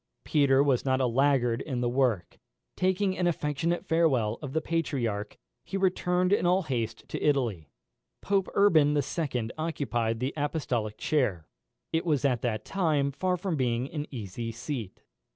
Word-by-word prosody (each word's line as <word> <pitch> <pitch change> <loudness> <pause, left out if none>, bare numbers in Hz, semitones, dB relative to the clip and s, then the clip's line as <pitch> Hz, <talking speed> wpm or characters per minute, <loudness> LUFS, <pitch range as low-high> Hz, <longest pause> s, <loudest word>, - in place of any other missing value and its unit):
Peter 140 -2 +4
was 135 -4 +2
not 130 -1 +1
a 130 - +2
laggard 125 -1 +2
in 130 -5 -3
the 120 - +1
work. 120 -7 0 0.4
Taking 190 +1 +1
an 180 -1 +1
affectionate 165 +2 -1
farewell 135 - +2
of 135 -2 -6
the 160 - +2
Patriarch, 135 -11 -2 0.3
he 195 - -4
returned 180 -1 +1
in - - +2
all 185 +2 +3
haste 115 -6 -3
to - - -4
Italy. 120 - 0 0.5
Pope 195 -2 0
Urban 155 -8 +5
II. 130 -5 -1
occupied 120 -8 -1
the 130 +3 -2
apostolic 130 -8 -2
chair. 105 - 0 0.5
It 160 - +1
was 150 -6 +1
at 125 -4 +2
that 110 -3 -2
time 155 -7 +1
far 180 +6 -1
from 180 -1 -2
being 125 0 -1
an 150 -2 -4
easy 115 -1 -5
seat. 115 -3 -6
140 Hz, 155 wpm, -28 LUFS, 120-165 Hz, 0.5 s, Urban